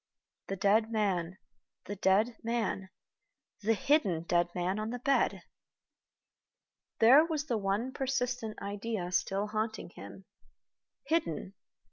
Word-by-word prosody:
The 195 Hz, -, -2 dB
dead 210 Hz, +4 st, +3 dB
man, 190 Hz, -5 st, 0 dB, 0.5 s
the 205 Hz, -, -5 dB
dead 200 Hz, +5 st, +2 dB
man, 225 Hz, -5 st, -2 dB, 0.7 s
the 225 Hz, +2 st, +2 dB
hidden 200 Hz, -, +2 dB
dead 175 Hz, 0 st, +2 dB
man 185 Hz, +3 st, -1 dB
on 215 Hz, +1 st, -3 dB
the 245 Hz, -, -3 dB
bed! 275 Hz, +3 st, +1 dB, 1.5 s
There 260 Hz, +7 st, +8 dB
was 315 Hz, -3 st, -2 dB
the 240 Hz, -6 st, 0 dB
one 205 Hz, +6 st, -1 dB
persistent 250 Hz, -4 st, -2 dB
idea 200 Hz, -2 st, -3 dB
still 195 Hz, +2 st, 0 dB
haunting 215 Hz, -3 st, -3 dB
him. 190 Hz, -, -11 dB, 0.8 s
Hidden! 275 Hz, -, -1 dB
215 Hz, 115 wpm, -31 LUFS, 195-240 Hz, 1.5 s, There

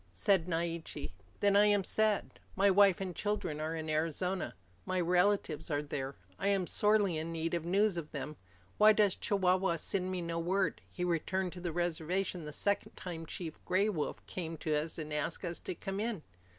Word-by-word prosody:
Said 170 Hz, -, +2 dB
Naiche, 165 Hz, -, -3 dB, 0.3 s
"Then 200 Hz, -1 st, +4 dB
I 205 Hz, +1 st, +7 dB
am 205 Hz, -1 st, +3 dB
sad. 215 Hz, +2 st, +1 dB, 0.2 s
My 195 Hz, +1 st, +5 dB
wife 195 Hz, -1 st, +5 dB
and 185 Hz, -3 st, -4 dB
children 195 Hz, -7 st, -2 dB
are 160 Hz, +1 st, -2 dB
in 160 Hz, -1 st, -4 dB
Arizona. 165 Hz, -, -1 dB, 0.3 s
My 185 Hz, 0 st, -1 dB
relatives 180 Hz, -2 st, +2 dB
are 145 Hz, -1 st, 0 dB
there. 135 Hz, -2 st, -4 dB, 0.2 s
I 195 Hz, -, 0 dB
am 195 Hz, -2 st, +2 dB
sorely 205 Hz, -4 st, +3 dB
in 160 Hz, +1 st, -4 dB
need 165 Hz, 0 st, -2 dB
of 170 Hz, -1 st, -1 dB
news 195 Hz, +2 st, +3 dB
of 160 Hz, -3 st, -5 dB
them. 150 Hz, +1 st, -5 dB, 0.4 s
Why 215 Hz, +1 st, +8 dB
does 205 Hz, -3 st, +3 dB
Chihuahua 185 Hz, -3 st, +2 dB
send 185 Hz, +2 st, -1 dB
me 185 Hz, -2 st, -2 dB
no 170 Hz, 0 st, -2 dB
word? 190 Hz, +3 st, 0 dB
He 180 Hz, -, -4 dB
returned 180 Hz, +2 st, 0 dB
to 180 Hz, -, -8 dB
the 175 Hz, -1 st, -2 dB
reservation 175 Hz, +1 st, -1 dB
the 150 Hz, -, -5 dB
second 200 Hz, +6 st, -1 dB
time 165 Hz, -3 st, -6 dB
Chief 165 Hz, -2 st, -6 dB
Gray 190 Hz, +4 st, +2 dB
Wolf 160 Hz, -8 st, -3 dB
came 165 Hz, -3 st, -4 dB
to 155 Hz, 0 st, -1 dB
us 155 Hz, +2 st, 0 dB
and 155 Hz, -2 st, -5 dB
asked 150 Hz, +5 st, -2 dB
us 170 Hz, -1 st, -3 dB
to -, -, -5 dB
come 195 Hz, +3 st, -4 dB
in." 215 Hz, -6 st, -2 dB
180 Hz, 190 wpm, -33 LUFS, 160-195 Hz, 0.4 s, Why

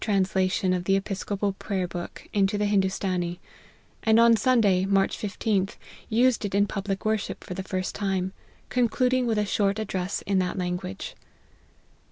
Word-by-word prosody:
93 -, -, -4 dB
translation 190 Hz, -1 st, +1 dB
of 180 Hz, -1 st, -2 dB
the 195 Hz, -, +3 dB
Episcopal 195 Hz, 0 st, -2 dB
Prayer 190 Hz, -2 st, -2 dB
book 175 Hz, 0 st, -7 dB
into 200 Hz, 0 st, +2 dB
the 210 Hz, -, +1 dB
Hindoostanee; 190 Hz, -3 st, 0 dB, 0.6 s
and 220 Hz, 0 st, +4 dB
on 230 Hz, 0 st, +7 dB
Sunday, 220 Hz, -7 st, +3 dB
March 195 Hz, 0 st, +2 dB
15th, 200 Hz, -1 st, -1 dB, 0.3 s
used 240 Hz, +1 st, +3 dB
it 200 Hz, -1 st, -2 dB
in 200 Hz, 0 st, +4 dB
public 195 Hz, -1 st, -3 dB
worship 215 Hz, -1 st, -1 dB
for -, -, -6 dB
the 190 Hz, -, -4 dB
first 185 Hz, -1 st, -3 dB
time, 190 Hz, -2 st, -1 dB, 0.4 s
concluding 250 Hz, +1 st, +2 dB
with 225 Hz, -2 st, +1 dB
a 210 Hz, -, +2 dB
short 200 Hz, 0 st, +1 dB
address 195 Hz, -3 st, -2 dB
in 195 Hz, -1 st, +1 dB
that 185 Hz, +1 st, -1 dB
language. 180 Hz, -, -4 dB
195 Hz, 160 wpm, -26 LUFS, 185-215 Hz, 0.6 s, on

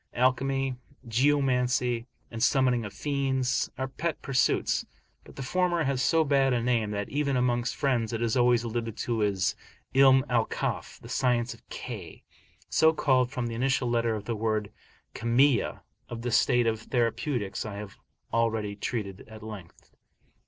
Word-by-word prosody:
Alchemy, 130 Hz, +1 st, +1 dB, 0.3 s
geomancy, 125 Hz, -1 st, +1 dB, 0.2 s
and 115 Hz, -1 st, -6 dB
summoning 125 Hz, -1 st, +3 dB
of 105 Hz, -, -6 dB
fiends, 130 Hz, +3 st, 0 dB
are 130 Hz, -, -2 dB
pet 155 Hz, +4 st, -3 dB
pursuits; 130 Hz, -2 st, +1 dB, 0.4 s
but -, -, -15 dB
the 135 Hz, -, -5 dB
former 175 Hz, +3 st, +1 dB
has 135 Hz, -2 st, 0 dB
so 160 Hz, +4 st, +3 dB
bad 135 Hz, -3 st, +3 dB
a 120 Hz, -1 st, 0 dB
name, 115 Hz, -3 st, +1 dB
that 100 Hz, -1 st, -3 dB
even 140 Hz, -2 st, 0 dB
amongst 120 Hz, -1 st, 0 dB
friends 120 Hz, -6 st, 0 dB
it 115 Hz, -, -2 dB
is 115 Hz, -1 st, 0 dB
always 120 Hz, -1 st, +4 dB
alluded 115 Hz, -1 st, -3 dB
to 115 Hz, -2 st, -1 dB
as 100 Hz, -2 st, +1 dB, 0.4 s
'Ilm 135 Hz, 0 st, +6 dB
al 120 Hz, -3 st, +2 dB
Kaf, -, -, -4 dB
the -, -, -12 dB
"science 120 Hz, -2 st, +1 dB
of -, -, -17 dB
K," -, -, -8 dB, 0.4 s
so 160 Hz, 0 st, +4 dB
called 130 Hz, -5 st, +2 dB
from 125 Hz, -2 st, -3 dB
the 115 Hz, -, -3 dB
initial 130 Hz, +1 st, 0 dB
letter 115 Hz, -1 st, +1 dB
of 105 Hz, -1 st, -6 dB
the 115 Hz, -, -2 dB
word 110 Hz, -1 st, -1 dB, 0.4 s
"Kimiya." 120 Hz, +2 st, +2 dB, 0.3 s
Of 115 Hz, -1 st, -6 dB
the 120 Hz, -, -2 dB
state 120 Hz, +1 st, +3 dB
of 110 Hz, -1 st, 0 dB
therapeutics 115 Hz, -2 st, -1 dB
I 105 Hz, -2 st, -6 dB
have 100 Hz, -1 st, -8 dB, 0.4 s
already 110 Hz, -3 st, 0 dB
treated 100 Hz, -2 st, -4 dB
at 110 Hz, -1 st, -11 dB
length. 105 Hz, -6 st, -10 dB
120 Hz, 160 wpm, -28 LUFS, 115-135 Hz, 0.4 s, Ilm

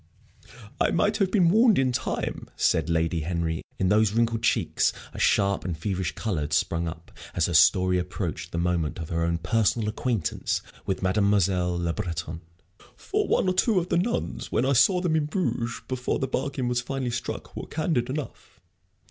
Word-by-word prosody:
"I -, -, +3 dB
might -, -, +1 dB
have 195 Hz, -3 st, +2 dB
been 185 Hz, -4 st, +4 dB
warned 225 Hz, +1 st, +5 dB
in 130 Hz, -1 st, +2 dB
time," 120 Hz, -, -3 dB
said 80 Hz, 0 st, +1 dB
Lady 85 Hz, 0 st, +1 dB
Henry, 80 Hz, 0 st, -2 dB, 0.2 s
in 95 Hz, 0 st, +1 dB
whose 105 Hz, -1 st, +4 dB
wrinkled 115 Hz, 0 st, +1 dB
cheeks -, -, +2 dB, 0.2 s
a -, -, -7 dB
sharp 100 Hz, 0 st, +2 dB
and 85 Hz, -3 st, -3 dB
feverish 95 Hz, -2 st, -2 dB
color 100 Hz, -9 st, -2 dB
had 75 Hz, +1 st, -3 dB
sprung 85 Hz, +3 st, +1 dB
up 80 Hz, +1 st, -8 dB, 0.2 s
as 85 Hz, -, +2 dB
her 90 Hz, -, -2 dB
story 90 Hz, +4 st, +5 dB
approached 90 Hz, -2 st, -4 dB
the -, -, -4 dB
moment 85 Hz, -2 st, 0 dB
of 80 Hz, -2 st, -6 dB
her 85 Hz, -1 st, -1 dB
own 85 Hz, 0 st, +1 dB
personal 110 Hz, +4 st, +1 dB
acquaintance 110 Hz, -5 st, -1 dB, 0.2 s
with 95 Hz, -1 st, -2 dB
Mademoiselle 95 Hz, -2 st, +2 dB
Le 85 Hz, -1 st, -1 dB
Breton. 85 Hz, -4 st, -4 dB, 0.5 s
"For -, -, -2 dB
one -, -, +2 dB
or 185 Hz, -, +2 dB
two 210 Hz, +3 st, +2 dB
of 180 Hz, 0 st, 0 dB
the -, -, +2 dB
nuns 230 Hz, +7 st, -2 dB
when 125 Hz, -, +1 dB
I 140 Hz, -, +2 dB
saw 180 Hz, -, +4 dB
them 170 Hz, -3 st, +1 dB
in 155 Hz, -2 st, +1 dB
Bruges, 125 Hz, -9 st, -2 dB
before 130 Hz, -1 st, -1 dB
the 135 Hz, -, -2 dB
bargain 135 Hz, -1 st, -2 dB
was 125 Hz, 0 st, 0 dB
finally 130 Hz, -1 st, -3 dB
struck, 120 Hz, -, -5 dB
were -, -, -6 dB
candid 150 Hz, -6 st, -1 dB
enough. 145 Hz, +1 st, -6 dB
100 Hz, 185 wpm, -26 LUFS, 85-130 Hz, 0.5 s, warned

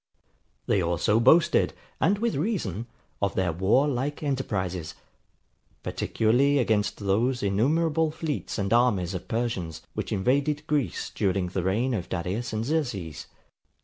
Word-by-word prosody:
They 100 Hz, -, +2 dB
also 85 Hz, +5 st, +2 dB
boasted, 155 Hz, +8 st, +4 dB, 0.3 s
and 195 Hz, +5 st, +3 dB
with 230 Hz, +2 st, 0 dB
reason, 135 Hz, -, -2 dB, 0.3 s
of 100 Hz, -1 st, 0 dB
their 95 Hz, -2 st, +1 dB
war 95 Hz, -, +3 dB
like 145 Hz, +3 st, -2 dB
enterprises; 95 Hz, -, -2 dB, 0.9 s
particularly 130 Hz, +6 st, +2 dB
against 110 Hz, -5 st, +1 dB
those 110 Hz, +5 st, 0 dB
innumerable 155 Hz, +11 st, +2 dB
fleets 155 Hz, -2 st, -4 dB
and 100 Hz, 0 st, 0 dB
armies 105 Hz, -7 st, +2 dB
of 90 Hz, -, -6 dB
Persians, 110 Hz, -9 st, -2 dB
which -, -, -4 dB
invaded 140 Hz, +8 st, +1 dB
Greece 150 Hz, -4 st, -1 dB
during 95 Hz, -3 st, 0 dB
the 95 Hz, +1 st, -2 dB
reigns 110 Hz, +7 st, +1 dB
of 90 Hz, -2 st, -6 dB
Darius 95 Hz, +7 st, -3 dB
and 110 Hz, +1 st, -2 dB
Xerxes. 120 Hz, -, -2 dB
115 Hz, 130 wpm, -26 LUFS, 95-145 Hz, 0.9 s, boasted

